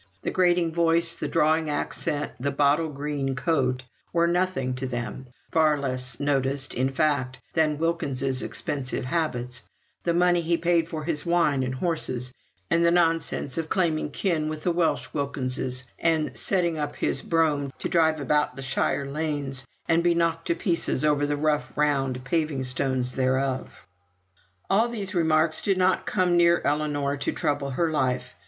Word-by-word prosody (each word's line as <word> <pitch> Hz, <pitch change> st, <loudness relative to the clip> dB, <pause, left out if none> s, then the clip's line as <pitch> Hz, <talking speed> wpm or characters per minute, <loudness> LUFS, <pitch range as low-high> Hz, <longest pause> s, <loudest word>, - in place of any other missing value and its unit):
The -, -, -1 dB
grating 175 Hz, -2 st, +2 dB
voice, 170 Hz, 0 st, +3 dB
the -, -, -4 dB
drawling 160 Hz, 0 st, +2 dB
accent, 145 Hz, 0 st, -2 dB
the 140 Hz, +3 st, 0 dB
bottle 145 Hz, +3 st, +2 dB
green 140 Hz, -2 st, -3 dB
coat, 130 Hz, -4 st, 0 dB, 0.3 s
were 170 Hz, 0 st, +3 dB
nothing 170 Hz, -7 st, 0 dB
to 130 Hz, 0 st, -3 dB
them; 120 Hz, +1 st, -5 dB, 0.2 s
far 155 Hz, -2 st, +3 dB
less 130 Hz, -1 st, -2 dB
noticed, 135 Hz, -1 st, +1 dB
in 130 Hz, +2 st, 0 dB
fact, 135 Hz, -2 st, 0 dB
than 155 Hz, -2 st, +2 dB
Wilkins's 140 Hz, -5 st, 0 dB
expensive 135 Hz, -3 st, -2 dB
habits, 125 Hz, -5 st, -2 dB, 0.4 s
the 170 Hz, -1 st, 0 dB
money 175 Hz, 0 st, +3 dB
he 170 Hz, +1 st, +1 dB
paid 170 Hz, -1 st, +1 dB
for 155 Hz, -2 st, -4 dB
his 150 Hz, -2 st, -2 dB
wine 170 Hz, -5 st, +2 dB
and 130 Hz, 0 st, -2 dB
horses, 130 Hz, -6 st, -2 dB, 0.4 s
and 165 Hz, +1 st, +4 dB
the 170 Hz, -, +5 dB
nonsense 165 Hz, -4 st, +1 dB
of 160 Hz, -1 st, -4 dB
claiming 165 Hz, -6 st, 0 dB
kin 155 Hz, -2 st, -1 dB
with 155 Hz, 0 st, -6 dB
the 175 Hz, -, +2 dB
Welsh 170 Hz, -1 st, 0 dB
Wilkinses, 130 Hz, -3 st, -2 dB, 0.2 s
and 160 Hz, -2 st, +1 dB
setting 170 Hz, -4 st, +1 dB
up 145 Hz, -1 st, -3 dB
his 135 Hz, -, 0 dB
brougham 150 Hz, -4 st, +1 dB
to -, -, -3 dB
drive 160 Hz, -2 st, +2 dB
about 140 Hz, -1 st, 0 dB
shire 135 Hz, +1 st, 0 dB
lanes, 140 Hz, -3 st, -3 dB, 0.2 s
and 165 Hz, 0 st, +3 dB
be 175 Hz, -1 st, +3 dB
knocked 165 Hz, -1 st, 0 dB
to 170 Hz, -, +1 dB
pieces 170 Hz, -6 st, 0 dB
over 145 Hz, -1 st, +2 dB
the 145 Hz, 0 st, -1 dB
rough 150 Hz, 0 st, -1 dB
round 135 Hz, -4 st, +1 dB
paving 155 Hz, -3 st, 0 dB
stones 130 Hz, 0 st, -1 dB
thereof. 130 Hz, 0 st, -1 dB, 0.8 s
All 215 Hz, +5 st, +3 dB
these 210 Hz, -5 st, -4 dB
remarks 160 Hz, -2 st, +2 dB
did 195 Hz, -2 st, +1 dB
not 185 Hz, 0 st, +2 dB
come 180 Hz, -3 st, +2 dB
near 170 Hz, 0 st, +5 dB
Ellinor 145 Hz, -1 st, 0 dB
to 140 Hz, -, -1 dB
trouble 145 Hz, -1 st, -1 dB
her 160 Hz, +5 st, 0 dB
life. 130 Hz, -8 st, -1 dB
150 Hz, 160 wpm, -25 LUFS, 135-170 Hz, 0.8 s, the